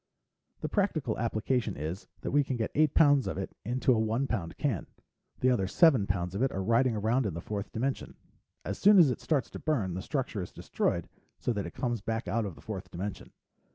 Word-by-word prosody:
"The - - -1
practical 155 - 0
application 115 +2 0
is 80 +6 -5
that - - -3
we 145 0 +4
can 135 -1 -3
get 110 - -2
eight 155 -1 +3
pounds 145 -4 +5
of - - -3
it - - -5
into 130 +4 +2
a 115 - +1
one 110 +4 +1
pound 95 -11 -3
can. 125 - -1 0.5
The 130 - +4
other 100 -6 +1
seven 125 - +5
pounds 90 -1 -1
of 100 - -2
it 135 - +2
are 95 - -2
riding 115 +3 +3
around 110 +3 +1
in 90 - -4
the - - -4
fourth 100 +3 -5
dimension. 130 +4 -2 0.5
As - - -4
soon 205 +1 +7
as 160 -8 +7
it - - -4
starts 140 -7 0
to - - -7
burn, 115 - 0
the 95 - -3
structure 125 -4 -2
is 90 - -6
destroyed, - - -1 0.3
so 120 - -1
that 100 -4 -3
it 85 - -10
comes 120 -4 -1
back 115 +2 -3
out 115 -1 0
of 90 - -7
the 70 - -15
fourth 95 -1 -6
dimension. 95 +3 -6
115 Hz, 225 wpm, -30 LUFS, 100-135 Hz, 0.5 s, soon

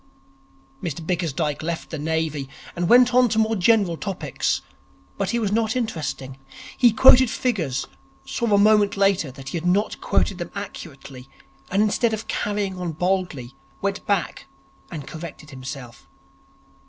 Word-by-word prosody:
Mr 165 -3 -4
Bickersdyke 160 -4 -1
left 165 +1 -4
the 160 - -4
Navy, 155 -3 -2 0.3
and 175 0 -1
went 245 0 +6
on 250 -1 +5
to 220 - -1
more 220 0 +2
general 195 -3 +3
topics. 195 0 -2 0.6
But - - 0
he 235 - 0
was 215 -4 0
not 220 +2 +1
interesting. 155 - -3 0.4
He 245 -2 +5
quoted 255 +2 +7
figures, 175 - -1 0.4
saw 235 -3 -2
a 205 - +5
moment 205 -1 +4
later 195 -6 +2
that 135 0 -9
he - - -3
had 170 +2 -3
not 200 +4 +1
quoted 195 -2 +1
them 175 - -4
accurately, 135 -9 -8 0.4
and 200 +3 +3
instead 220 +1 +1
of 220 - -9
carrying 205 -3 -2
on 175 -2 -3
boldly, 175 -7 -1 0.3
went 200 0 -2
back 200 -4 -1 0.4
and 150 -5 -6
corrected 155 -1 -9
himself. 130 -2 -9
185 Hz, 150 wpm, -23 LUFS, 155-215 Hz, 0.6 s, quoted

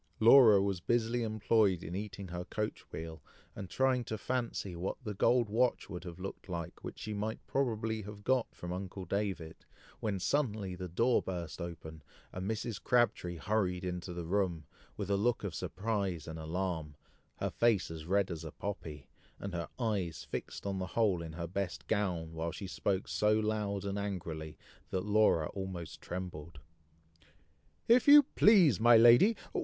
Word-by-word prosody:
Laura 115 -3 +8
was 100 -2 0
busily 120 +3 +1
employed 110 -4 +2
in 85 - -6
eating 100 -2 -6
her 90 0 -4
coach 105 +3 -4
wheel, 80 -1 -7 0.3
and 95 -2 -7
trying 130 -2 +2
to 110 -1 -4
fancy 115 -6 -3
what 90 +3 -3
the 105 -3 -4
gold 120 +4 +3
watch 115 0 +1
would 90 -2 -6
have 85 -2 -7
looked 95 +1 -7
like 85 0 -5
which - - -7
she 110 - -5
might 105 +2 -2
probably 110 -4 -1
have 105 0 -9
got 130 +1 +2
from 90 0 -5
uncle 95 0 -6
David, 95 -4 -3 0.4
when 105 -3 -1
suddenly 105 -3 0
the 90 0 -5
door 115 +8 +2
burst 85 -2 -5
open, 80 -2 -7 0.3
and 95 +2 -4
Mrs. 110 -1 -3
Crabtree 120 -8 +2
hurried 90 -1 -1
into 90 0 -4
the 85 -1 -5
room, 85 -3 0 0.3
with 100 -1 -3
a - - +4
look 120 +3 +1
of 100 -5 -3
surprise 95 -1 -2
and 80 0 -6
alarm, 80 -2 -3 0.4
her - - -3
face 115 -7 +2
as 80 -1 -8
red 100 0 +2
as 80 -1 -5
a 80 - -6
poppy, 80 -9 -6 0.3
and 100 -2 -6
her 85 -1 -3
eye 105 -7 0
fixed - - -6
on 100 -1 -2
the 95 - -3
hole 100 -7 +3
in 80 -1 -7
her 85 +1 -4
best 95 +2 -4
gown, 90 -7 -1
while 80 +1 -3
she 100 - -7
spoke 95 0 -1
so 105 0 +2
loud 105 -2 -1
and 100 0 -2
angrily, 85 -6 -5 0.3
that 95 0 -2
Laura 105 -7 +3
almost 95 -4 -6
trembled. 85 -3 -6 1.3
"If 240 +3 +5
you 290 0 +10
please, 185 - +6
my 120 +1 +7
lady! 120 - +7
100 Hz, 170 wpm, -33 LUFS, 85-110 Hz, 1.3 s, you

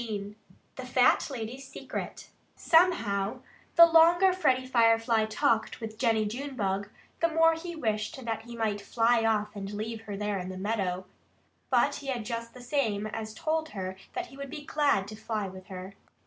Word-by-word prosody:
XV 205 -3 -5 0.4
THE - - -5
FAT - - +3
LADY'S 260 +1 -6
SECRET - - -7 0.3
Somehow, 230 - +2 0.3
the 335 - +11
longer 340 +3 +6
Freddie 260 -8 +2
Firefly 230 -2 +3
talked 220 +1 0
with 220 -1 -7
Jennie 225 -3 +2
Junebug, 210 -5 -3 0.3
the 335 - +3
more 325 0 +4
he 340 +1 -6
wished 220 -2 -2
that 225 -1 -2
he 235 +1 -10
might 215 -3 -1
fly 230 +2 +2
off 210 -1 0
and 195 -1 -5
leave 220 +2 -4
her 205 -2 -5
there 205 -1 -2
in 180 0 -5
the 185 - -6
meadow. 190 -2 -2 0.6
But - - +3
he 280 - -10
had 245 -5 -2
just 230 0 -5
the 250 - -11
same 230 -6 0
as 215 0 -5
told 315 +4 -1
her 185 0 -4 0.2
that 365 -1 -3
he 275 - -14
would 280 0 -6
be 295 +2 -8
glad 285 -12 +1
to 215 - -8
fly 215 -2 -3
with 185 0 -11
her. 190 0 -8
225 Hz, 175 wpm, -29 LUFS, 210-275 Hz, 0.6 s, the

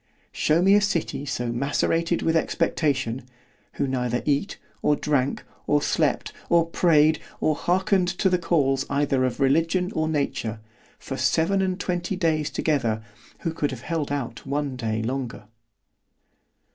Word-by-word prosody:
Shew 160 +3 +2
me 195 +1 +6
a 205 - +6
city 170 -7 -1
so 120 -2 -2
macerated 165 +6 0
with 165 - +2
expectation——who 130 -7 -2
neither 125 -2 -1
eat, 145 +6 0 0.2
or 150 - +3
drank, 140 -3 0 0.2
or 150 - +4
slept, 145 -2 0 0.2
or 170 -1 +4
prayed, 160 -2 +3 0.2
or 155 - +2
hearkened 185 +3 +1
to 190 +2 0
the 180 -1 +2
calls 135 -6 +1
either 140 -2 +1
of 130 +1 -1
religion 165 +7 +2
or 155 0 0
nature, 130 -7 -2 0.4
for - - -6
seven 190 +4 +2
and 185 0 -1
twenty 180 +1 -2
days 160 -5 +1
together, 115 -8 0 0.4
who 165 - -2
could 150 -3 -1
have 125 -3 -7
held 155 -1 -2
out 120 -6 -4
one 140 -1 -2
day 110 -2 -2
longer. 125 -1 -4
150 Hz, 145 wpm, -25 LUFS, 130-170 Hz, 0.4 s, me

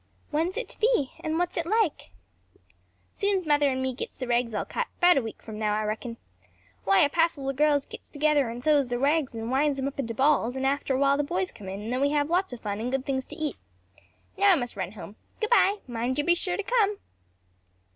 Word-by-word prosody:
"When 315 +3 +1
is 370 - -6
it 485 - -3
to - - -11
be? 435 - +2
and 315 0 -2
what 355 +1 0
is - - -10
it 335 - -1
like?" 430 -4 0 1.0
"Soon's 395 -3 0
mother 290 -2 +3
and 260 0 -1
me 260 0 -1
gits 250 - -7
the 255 - -4
rags 240 -2 0
all - - -1
cut; 485 - -3
'bout 355 -4 +6
a - - -2
week 225 -2 -8
from 215 -1 -8
now, 210 -1 +1
I 215 - -1
reckon. 225 +2 -4 0.7
Why 195 0 +5
a - - +6
passel 325 -3 +1
o' 275 - 0
girls 290 0 +2
gits - - -11
together 295 -3 +2
and 240 +2 -7
sews 290 -3 +3
the 245 0 -2
rags 280 0 +1
and 225 +1 -4
winds 280 +1 +2
'em 270 0 -1
up 280 - -7
into 230 -4 -3
balls, 265 -2 +2
and 265 0 -2
after 275 0 0
awhile 275 +1 +3
the 290 - +1
boys 190 -9 -2
come 195 -2 -10
in 195 +2 -5
and 225 +3 -4
then 255 - -1
we 280 - +3
have 295 +1 +1
lots 365 0 +1
o' 245 - -6
fun 205 -2 -4
and 240 +3 -3
good 265 0 -1
things 265 -1 -1
to 300 - -9
eat. 310 -2 -3 0.8
Now 400 -1 +6
I - - +5
must 245 -7 -3
run 190 -1 -4
home. 205 0 -10 0.2
Good 435 0 -2
bye, 410 -3 +5
mind 245 +1 -2
you're 295 - +1
to 345 - -3
be - - +7
sure 355 +1 -1
to 415 - -2
come." 420 -3 +2
275 Hz, 255 wpm, -27 LUFS, 240-320 Hz, 1.0 s, be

